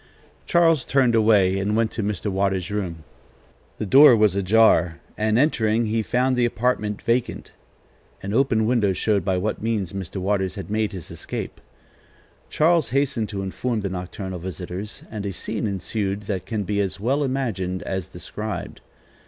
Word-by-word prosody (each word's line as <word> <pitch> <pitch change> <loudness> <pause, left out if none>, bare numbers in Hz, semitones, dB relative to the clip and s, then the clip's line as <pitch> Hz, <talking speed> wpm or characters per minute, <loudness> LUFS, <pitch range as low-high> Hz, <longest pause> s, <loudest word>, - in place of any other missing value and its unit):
Charles 165 -5 +4
turned 130 -3 +2
away 105 -4 +4
and 100 +2 0
went 115 0 +1
to 115 - -3
Mr. 105 0 -2
Waters' 95 -1 -1
room. 90 -6 -4 0.7
The - - -3
door 135 +5 +8
was 105 -3 +3
ajar, 95 -4 +3 0.2
and, 110 +1 +1
entering, 115 -5 +2
he 110 +1 0
found 125 +3 +1
the 125 - +2
apartment 115 -3 0
vacant. 120 +1 -1 0.7
An 100 +1 -3
open 115 -3 +2
window 110 -5 +2
showed 100 0 0
by 95 0 0
what 105 +4 -2
means 105 -5 -2
Mr. 95 -1 -6
Waters 95 0 -1
had 95 -1 -7
made 110 -1 0
his 95 -5 -8
escape. - - -6 0.9
Charles 165 0 +2
hastened 130 -4 0
to 100 -2 -4
inform 110 +4 -2
the 100 - -2
nocturnal 95 0 -5
visitors, 90 +3 -7
and 105 -2 -5
a 100 - -3
scene 110 +4 -3
ensued 100 +1 -2
that 100 -3 -4
can 110 -3 -2
be 100 +1 0
as 95 -1 -3
well 135 +8 +1
imagined 110 -9 -2
as 95 -3 -3
described. 105 -4 -6
105 Hz, 160 wpm, -23 LUFS, 95-115 Hz, 0.9 s, door